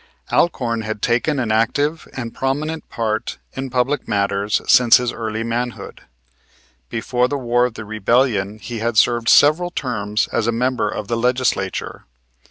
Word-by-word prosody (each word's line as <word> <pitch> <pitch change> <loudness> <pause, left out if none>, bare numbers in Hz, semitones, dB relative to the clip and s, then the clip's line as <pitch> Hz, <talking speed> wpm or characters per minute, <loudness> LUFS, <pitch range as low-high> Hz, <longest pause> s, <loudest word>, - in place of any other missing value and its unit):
Alcorn 120 -9 +1
had 110 -1 -4
taken 125 +5 +1
an 120 -4 -1
active 145 +8 0
and 120 -3 -5
prominent 150 +4 -3
part 110 -2 -2 0.2
in 135 0 -5
public 125 +3 0
matters 100 0 0
since 120 -2 +7
his 125 -1 -2
early 110 0 -3
manhood. 120 +1 -4 0.9
Before 125 +2 0
the 145 - -2
War 120 -1 +2
of 115 - -11
the 110 - -7
Rebellion 110 -1 +1
he 115 +1 -6
had 115 0 -1
served 120 0 +3
several 160 +5 +5
terms 110 -9 -2
as 115 - 0
a - - +3
member 125 -1 0
of 105 -1 -5
the 115 - -1
Legislature. 125 -5 -1
120 Hz, 155 wpm, -20 LUFS, 110-130 Hz, 0.9 s, since